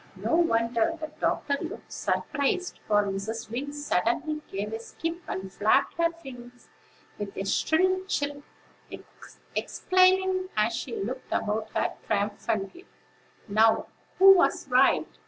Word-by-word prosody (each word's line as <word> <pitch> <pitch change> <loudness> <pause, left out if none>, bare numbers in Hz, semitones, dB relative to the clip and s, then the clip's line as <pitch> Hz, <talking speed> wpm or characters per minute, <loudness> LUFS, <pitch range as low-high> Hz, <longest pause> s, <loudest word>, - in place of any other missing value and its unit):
No - - -1
wonder 235 -2 +2
the 310 -1 -6
doctor 280 -1 0
looked 350 +6 -7
surprised; 285 +6 -1
for 205 -1 +4
Mrs. 205 +3 -4
Wing 270 +5 -3
suddenly 290 - -1
gave 205 +2 -4
a 225 - -3
skip, 330 +8 -5
and 190 0 -5
flapped 210 +1 +2
her 335 - +5 0.2
wings, 245 -1 -11 0.5
with 205 -1 -6
a 195 - -3
shrill 370 - +2
chirp, 285 -6 -2 1.1
exclaiming, 370 0 +2
as 215 +2 +2
she 240 - -5
looked 255 +6 -5
about 215 +1 -1
her - - 0
triumphantly: 210 - -2 0.6
"Now, 220 +2 +3 0.3
who 390 +1 +9
was 350 -5 +2
right? 255 +2 +4
250 Hz, 125 wpm, -27 LUFS, 215-330 Hz, 1.1 s, who